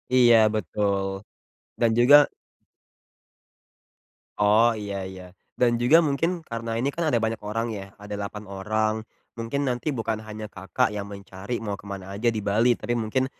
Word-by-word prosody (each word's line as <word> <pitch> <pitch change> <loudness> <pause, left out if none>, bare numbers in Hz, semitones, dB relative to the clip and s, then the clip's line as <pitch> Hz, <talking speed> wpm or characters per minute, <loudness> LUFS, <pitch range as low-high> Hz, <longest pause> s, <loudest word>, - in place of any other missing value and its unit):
Iya 120 -2 +7 0.2
betul, 100 0 0 0.7
dan 115 -1 +4
juga 125 +5 +8 2.2
Oh 105 +3 +5
iya 100 -2 -4
iya. 95 -1 -9 0.2
Dan 120 -1 +2
juga 125 +7 +6
mungkin 165 +2 0
karena 115 0 -4
ini 135 +4 -1
kan 165 -2 0
ada 120 - +2
banyak 115 0 -1
orang 115 +2 -2
ya, 100 -2 -6
ada 105 0 -8
8 105 +1 -5
orang. 110 +3 -1 0.3
Mungkin 120 +5 -2
nanti 125 +3 -1
bukan 115 -5 -2
hanya 110 0 -7
Kakak 95 0 -1
yang 100 -1 -5
mencari 100 +3 -6
mau 105 -3 -4
ke 100 0 -9
mana 95 -1 -7
aja 110 +4 +1
di 115 - -2
Bali, 115 +4 +3
tapi 120 - -2
mungkin 120 +3 0
110 Hz, 155 wpm, -25 LUFS, 100-120 Hz, 2.2 s, juga